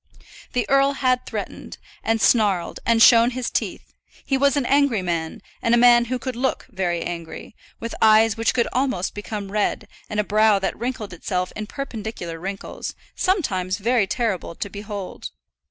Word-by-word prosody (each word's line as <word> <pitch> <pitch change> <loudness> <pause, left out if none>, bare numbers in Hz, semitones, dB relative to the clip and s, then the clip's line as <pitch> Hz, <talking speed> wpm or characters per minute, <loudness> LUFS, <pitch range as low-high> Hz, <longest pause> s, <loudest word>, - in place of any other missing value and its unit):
The 250 - 0
earl 275 0 +4
had 255 -2 0
threatened, - - -6 0.3
and 225 0 +1
snarled, 205 -7 +2
and 230 -1 +5
shown 235 0 +7
his 255 - -2
teeth; - - -3 0.3
he 270 - +1
was 280 +1 +3
an 275 - 0
angry 275 -7 +2
man, 165 -2 -3 0.2
and 230 +1 +3
a - - +3
man 240 0 +6
who 255 +2 -2
could 250 +1 -5
look 260 +2 -1
very 180 -4 -1
angry; 170 +4 -7 0.2
with 230 0 -5
eyes 220 0 +5
which 225 0 0
could 235 - +2
almost 255 -9 0
become 205 -1 -6
red, 210 0 -1 0.2
and 210 - -2
a - - +3
brow 215 0 +4
that 195 - -2
wrinkled 230 -4 -4
itself 180 +1 -3
in 215 0 -5
perpendicular 220 -10 -6
wrinkles, 195 +3 -6 0.2
sometimes 190 - 0
very 225 -1 +1
terrible 195 -7 -2
to 200 - -5
behold. 200 - -6
220 Hz, 170 wpm, -22 LUFS, 195-245 Hz, 0.3 s, shown